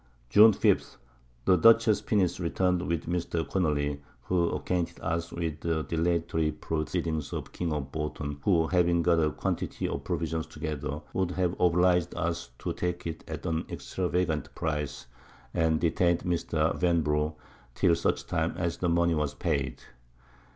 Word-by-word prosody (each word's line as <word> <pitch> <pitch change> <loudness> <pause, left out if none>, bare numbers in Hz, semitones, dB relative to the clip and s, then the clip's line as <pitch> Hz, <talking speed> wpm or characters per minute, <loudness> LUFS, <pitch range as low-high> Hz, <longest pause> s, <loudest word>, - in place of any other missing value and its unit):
June 110 - +9
5. 100 - +1 0.5
The 90 - +5
Dutchess's 115 +3 +5
Pinnace 90 -5 +1
return'd 90 +1 +1
with 85 -1 -1
Mr. 85 -1 -2
Connely, 75 -5 0 0.2
who 85 +1 +1
acquainted 90 -2 -2
us 85 0 -2
with 80 -3 -3
the 80 -2 -1
dilatory 80 -1 0
Proceedings 80 0 -2
of - - -3
the - - -17
King 85 -2 -3
of 70 -3 -3
Bouton, 75 -2 -4
who 85 -1 +3
having 85 -1 +2
got 85 -1 +3
a 75 -1 +3
Quantity - - -2
of - - -4
Provisions 80 -1 -2
together, 75 0 -5
would 95 -1 0
have 90 -1 0
oblig'd 90 0 +3
us 85 -4 -2
to - - -3
take 90 0 -3
it 80 -1 -5
at 80 +1 -6
an 80 -2 0
extravagant 90 -4 -2
Price, 75 -5 -3 0.5
and 80 -2 +2
detain'd 85 +1 +2
Mr. 80 -2 0
Vanbrugh, 75 -3 +1 0.4
till - - +4
such 85 - 0
time 80 +1 -1
as 85 -2 -1
the 90 - 0
Money 85 0 +3
was 75 -3 -1
paid. 65 -3 -2
85 Hz, 150 wpm, -28 LUFS, 75-90 Hz, 0.5 s, June